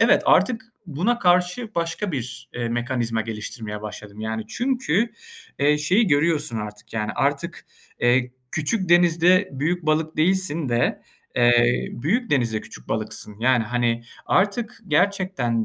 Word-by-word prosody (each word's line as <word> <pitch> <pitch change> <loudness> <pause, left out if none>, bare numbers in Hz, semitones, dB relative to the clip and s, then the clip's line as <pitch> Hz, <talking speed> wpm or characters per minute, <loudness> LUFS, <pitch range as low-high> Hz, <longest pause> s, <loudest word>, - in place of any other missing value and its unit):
Evet, - - +5
artık 230 -3 +3 0.2
buna 185 +10 0
karşı 180 +4 +2
başka 170 +3 -2
bir, 125 -1 -5
eee, 120 -1 -2
mekanizma 120 -1 -1
geliştirmeye 105 -1 -6
başladım, 105 0 -8
yani. 110 0 -3
Çünkü, 240 - 0 0.5
eee, 150 +1 +3
şeyi 185 +9 +3
görüyorsun 150 -4 +1
artık, 105 0 -8
yani, 105 -2 -2
artık, - - -1 0.3
eee, 125 +1 +2 0.2
küçük 180 +5 -1
denizde 175 +2 +4
büyük 155 +5 -2
balık 155 +1 +1
değilsin 170 -3 +1
de, 120 0 0 0.3
eee, 120 0 +4
büyük 215 - -1
denizde 115 -6 +1
küçük 60 - -13
balıksın. 105 - -4
Yani, 125 -1 +3
hani, 120 0 0 0.2
artık 215 +5 0
gerçekten 175 - +1
145 Hz, 130 wpm, -23 LUFS, 120-180 Hz, 0.5 s, Evet